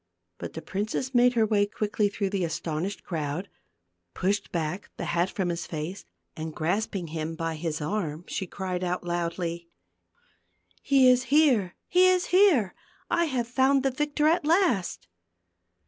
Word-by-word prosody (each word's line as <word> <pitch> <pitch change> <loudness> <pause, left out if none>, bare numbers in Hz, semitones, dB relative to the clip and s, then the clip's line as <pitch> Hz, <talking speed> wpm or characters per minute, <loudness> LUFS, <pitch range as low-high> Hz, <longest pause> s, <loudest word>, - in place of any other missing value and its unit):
But - - -6
the 160 - -7
princess 215 +7 -3
made 245 0 +5
her 225 -2 +3
way 205 -1 +2
quickly 210 0 0
through 200 -1 -2
the 195 -2 0
astonished 165 +3 -3
crowd, 160 +2 -3 0.7
pushed 200 +2 -1
back 170 +3 -3
the - - -4
hat 175 +2 +1
from 190 -3 -2
his 170 0 -3
face 160 +4 -5 0.3
and 160 0 -6
grasping 180 +1 -1
him 160 +1 -4
by 165 0 -2
his 160 -1 -3
arm, 160 -1 -3
she 190 - -3
cried 185 -1 -4
out 180 0 -2
loudly, 170 0 -3 1.1
"He 270 -2 +4
is 250 0 +4
here, 270 - +3
he 365 +1 +5
is 365 -1 +3
here! 335 - +5 0.4
I 340 -1 +3
have 255 -6 -1
found 265 +2 +3
the 270 - +2
victor 295 +3 -1
at 335 +2 +3
last." 290 - +1
195 Hz, 155 wpm, -27 LUFS, 170-255 Hz, 1.1 s, made